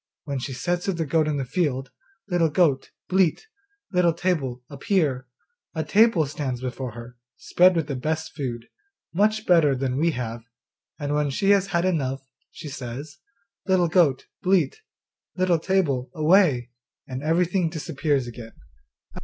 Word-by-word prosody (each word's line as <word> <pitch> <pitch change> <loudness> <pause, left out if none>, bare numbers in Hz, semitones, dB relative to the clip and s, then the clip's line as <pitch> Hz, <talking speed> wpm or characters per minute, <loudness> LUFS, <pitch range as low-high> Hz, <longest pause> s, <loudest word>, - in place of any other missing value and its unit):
When 140 -2 -3
she 130 +2 -5
says 175 +6 -2
to 195 - 0
the 165 -2 -2
goat 155 +2 +1
in 150 -1 0
the 135 - -2
field, 135 -3 -1 0.4
"Little 175 -4 +2
goat, 150 -5 +2 0.2
bleat, 185 - +2 0.5
Little 180 -3 +3
table, 145 -9 -2
appear," 140 -3 -1 0.5
a 160 - -1
table 210 -5 +4
stands 135 -3 -4
before 125 -1 -5
her, 120 +1 -10 0.2
spread 180 +1 +4
with 165 -3 0
the 140 -2 -4
best 155 +5 -3
food, 120 -5 -4 0.5
much 215 +4 +1
better 165 -6 +4
than 130 0 -2
we 170 +2 +3
have; 115 -2 -4 0.6
and 145 -1 -3
when 150 -1 +1
she 195 +9 +2
has 200 -1 +3
had 170 -1 0
enough, 135 -7 -1 0.3
she 160 - -10
says, 140 +1 -7 0.5
"Little 185 -2 +3
goat, 160 -7 +3 0.2
bleat, 195 - +1 0.5
Little 185 -3 +2
table, 155 -9 0
away," 155 -7 +3 0.4
and 130 0 -5
everything 170 +3 +1
disappears 150 -4 -1
again. 120 -1 -9
155 Hz, 150 wpm, -24 LUFS, 130-180 Hz, 0.6 s, table